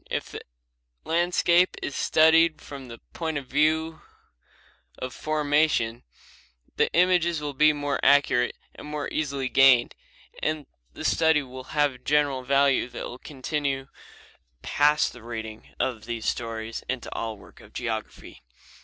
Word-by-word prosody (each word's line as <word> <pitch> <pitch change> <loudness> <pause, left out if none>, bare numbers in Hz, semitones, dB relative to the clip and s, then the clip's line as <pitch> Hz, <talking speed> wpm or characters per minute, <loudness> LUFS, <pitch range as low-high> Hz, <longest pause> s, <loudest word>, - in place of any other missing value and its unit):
If - - -3
the - - -7 0.6
landscape 175 +1 +2
is 140 - -4
studied 160 0 +4
from 135 -2 -10
the 115 -1 -9 0.2
point 160 -3 -3
of 140 - -5
view 155 +4 +1 1.0
of 130 -1 -6
formation, 150 -6 +1 0.7
the - - +1
images 175 -2 +3
will 145 -1 -4
be 155 +3 +5
more 145 -1 -2
accurate 135 -3 +3 0.2
and - - -11
more 150 -1 -4
easily 140 -3 -2
gained, 125 -1 +5 0.5
and 155 -1 -2 0.3
the - - -7
study 160 -2 +3
will 130 0 -10
have 145 -2 +3
a - - -13
general 145 -1 +1
value 135 -1 +2
that 120 - -6
will 125 - -8
continue 140 -1 -3 0.7
past 150 +1 +2
the 125 - -13
reading 110 -1 -7
of 115 -4 -2
these 115 -1 -5
stories 115 -1 -3
into 130 -2 -4
all 110 -2 -4
work - - -17
in - - -16
geography. - - -6
140 Hz, 140 wpm, -26 LUFS, 125-155 Hz, 1.0 s, be